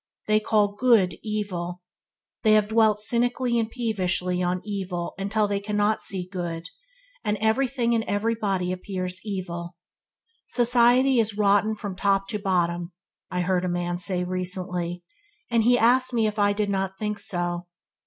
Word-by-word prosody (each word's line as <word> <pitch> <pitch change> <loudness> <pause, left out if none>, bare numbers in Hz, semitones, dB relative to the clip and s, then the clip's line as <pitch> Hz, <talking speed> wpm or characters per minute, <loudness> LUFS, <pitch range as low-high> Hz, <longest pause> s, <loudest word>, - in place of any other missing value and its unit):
They 215 0 +3
call 210 -1 +2
good, 205 -6 +3
evil. 180 -5 -4 0.6
They 220 -3 +4
have 210 -1 +3
dwelt 220 -2 +3
cynically 240 +2 0
and 225 -1 -1
peevishly 185 -6 -1
on 180 +1 -1
evil 190 -4 -4 0.2
till 215 0 +2
they 200 -1 -1
cannot 210 +1 0
see 185 -2 -3
good, 170 -3 -4 0.6
and 210 -1 0
everything 235 +2 +1
and 225 -1 +1
everybody 205 -4 -1
appears 185 0 -4
evil. 175 -4 -5 0.7
"Society 245 +1 +4
is 220 -2 0
rotten 205 +1 +3
from 205 -3 -6
top 195 0 +1
to 210 - -2
bottom", 175 -3 0 0.4
I 180 - -1
heard 180 0 +1
a 180 - -1
man 175 0 -2
say 180 -1 0
recently; 180 -1 -3 0.5
and 230 -1 +3
he 245 +1 +5
asked 250 +2 +3
me 225 -2 +3
if 210 0 -2
I 205 0 +4
did 205 0 -1
not 190 -1 -2
think 210 0 -3
so. 175 -1 -2
205 Hz, 155 wpm, -25 LUFS, 180-220 Hz, 0.7 s, he